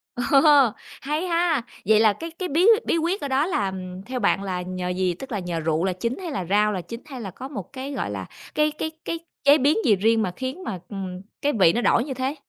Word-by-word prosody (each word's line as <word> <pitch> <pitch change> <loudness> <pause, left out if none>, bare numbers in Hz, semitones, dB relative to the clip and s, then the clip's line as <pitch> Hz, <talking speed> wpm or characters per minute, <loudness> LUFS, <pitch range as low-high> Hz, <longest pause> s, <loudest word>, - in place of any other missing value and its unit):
Ồ, 245 - -3 0.8
hay 300 +4 -1
ha! 335 -5 +2 0.2
Vậy 215 +2 +5
là 220 -2 +5
cái 330 +8 -7
cái 360 +2 -5
bí 335 +7 +3 0.2
bí - - +1
quyết 340 +5 0
ở 285 - -2
đó 270 +3 +2
là 200 - -1 0.3
theo 255 0 -4
bạn 200 -2 +2
là 180 -2 -2
nhờ 180 0 -4
gì, 180 0 0
tức 255 +9 -10
là 210 - -1
nhờ 175 -2 -3
rượu 160 +1 0
là 190 -1 +1
chính 230 +7 -3
hay 355 -4 -5
là 190 -10 -3
rau 210 +4 +3
là 185 -3 -2
chính, 230 +6 -8
hay 260 -5 -8
là 195 -3 -6
có 260 - -8
một 220 - -8
cái, 270 +1 -5
gọi 275 - -3
là, - - -5 0.3
cái 305 0 +3
cái 315 +1 -4
cái 335 - -2 0.2
chế 285 +1 +7
biến 290 +4 +3
gì 210 - +5
riêng 225 +3 +2
mà 185 -4 -1
khiến 260 +8 -5
mà, 190 - -4
ừm, 185 -3 -5 0.2
cái 290 +1 +1
vị 185 -6 +5
nó 240 - 0
đổi 235 - +3
như 275 - -4
thế? 260 +3 -2
240 Hz, 255 wpm, -24 LUFS, 190-295 Hz, 0.8 s, chế